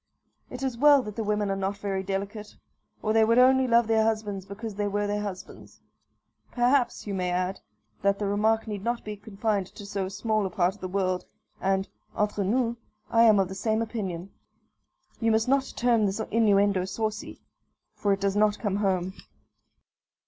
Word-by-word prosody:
It 255 +1 -7
is 255 -3 -2
well 290 -1 +6
that 210 -2 -7
the 225 - -2
women 210 -1 0
are - - 0
not 195 +1 -2
very 195 -2 -2
delicate, 200 +2 -5 0.5
or 215 - +1
they 225 0 +5
would 230 +2 +3
only 260 +1 +5
love 235 -1 +4
their 220 0 +3
husbands 210 -3 -2
because 210 +2 -6
they 205 +1 -2
were 205 +1 -1
their 205 0 -1
husbands. 195 -3 -8 0.7
Perhaps, 250 +1 +1
you 205 - -4
may 180 -2 -1
add, 180 +2 -1 0.4
that 200 0 +2
the 205 - -2
remark 215 +2 +1
need 205 -2 -5
not 235 +1 -1
be 210 0 -5
confined 205 -1 -2
to 205 - -11
so 200 -2 -3
small 215 +2 -1
a - - -6
part 180 +1 +1
of 210 - -19
the 185 - -3
world; 185 -1 -1 0.4
and, 195 0 +1 0.3
entre 210 -1 0
nous, 235 +3 0 0.3
I 230 - +4
am 215 -2 +6
of 195 -1 +2
the 190 - -7
same 220 +3 0
opinion. 195 -5 -5 0.9
You 230 - +1
must 220 +1 +2
not 270 +1 +1
term 235 -4 +3
this 195 +3 -3
innuendo 200 -4 +3
saucy, 215 +2 -4 0.5
for 205 - 0
it 195 0 0
does 200 0 0
not 210 0 +3
come 200 -3 -1
home. 190 -2 0
205 Hz, 185 wpm, -27 LUFS, 195-225 Hz, 0.9 s, well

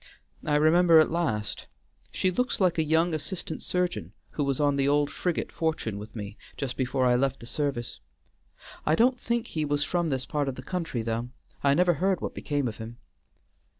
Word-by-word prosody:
I 150 - +1
remember 165 +3 +6
at 155 - +4
last; 120 -12 -1 0.4
she 185 - +1
looks 250 +7 0
like 180 -4 +3
a - - +4
young 160 +2 +2
assistant 155 +1 -3
surgeon 180 -1 -2 0.2
who 150 - -1
was 140 -2 0
on 145 -1 +3
the 140 0 +2
old 145 0 +2
frigate 180 -2 -2
Fortune 155 -11 -2
with 105 +3 -10
me 105 -1 -7 0.2
just 135 -3 -3
before 130 0 0
I 125 - +5
left 135 +1 +1
the - - -10
service. 130 -2 -3 0.8
I 155 - +3
don't 245 +6 +3
think 235 0 -1
he 155 - -2
was 145 0 +1
from 175 +1 0
this 130 -3 -1
part 145 -3 -1
of 130 - -4
the 130 - -8
country 165 -8 -3
though; 115 +2 -2 0.3
I 140 0 +4
never 175 +2 +4
heard 185 +4 +1
what - - -4
became 145 -3 -1
of 110 - -5
him." 115 +1 -8
145 Hz, 195 wpm, -27 LUFS, 130-170 Hz, 0.8 s, remember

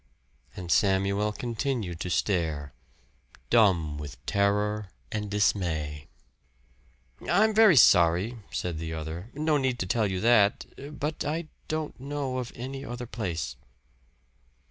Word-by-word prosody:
And 90 -2 -5
Samuel 100 +1 +2
continued 115 - -3
to 90 - -3
stare, 80 -3 -1 0.8
dumb 85 -10 +3
with 75 -2 -7
terror 105 0 +1 0.2
and 105 -1 -3
dismay. 80 -8 0 1.2
"I'm 215 +5 +4
very 215 -5 +7
sorry," 90 +1 +5
said 85 -3 -3
the 80 0 -4
other 80 +6 -6
"no 155 +1 +2
need 130 -3 0
to 95 - -2
tell 105 +2 +1
you 95 -1 -2
that. 110 -3 +4 0.3
But 150 +2 -2
I 155 +2 -3 0.2
don't 155 -3 -3
know 135 -1 -3
of 125 -2 -5
any 135 +3 -6
other 120 -2 -6
place." 100 -8 -4
105 Hz, 120 wpm, -27 LUFS, 85-130 Hz, 1.2 s, very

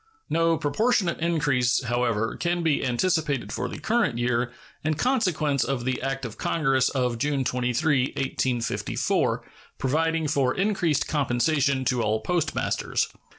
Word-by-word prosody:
No 165 0 +3
proportionate 180 +5 +1
increase, 145 -7 +1
however, 120 -2 0
can 175 0 -1
be 155 -3 +1
anticipated 140 +2 0
for - - -2
the - - -6
current 225 - +1
year, 120 0 0 0.3
in 155 0 +1
consequence 170 - +1
of 125 -2 -2
the 130 0 -1
act 135 0 -2
of 115 - -8
Congress 135 -5 +2
of 125 -3 -1
June 145 0 0
23, 125 +3 +1
1854, 130 -3 -1 0.3
providing 160 +3 0
for 135 -3 +1
increased 185 -7 +1
compensation 140 -1 +1
to 125 -2 +1
all 110 0 +1
postmasters. 160 +3 -1
140 Hz, 130 wpm, -25 LUFS, 125-165 Hz, 0.3 s, No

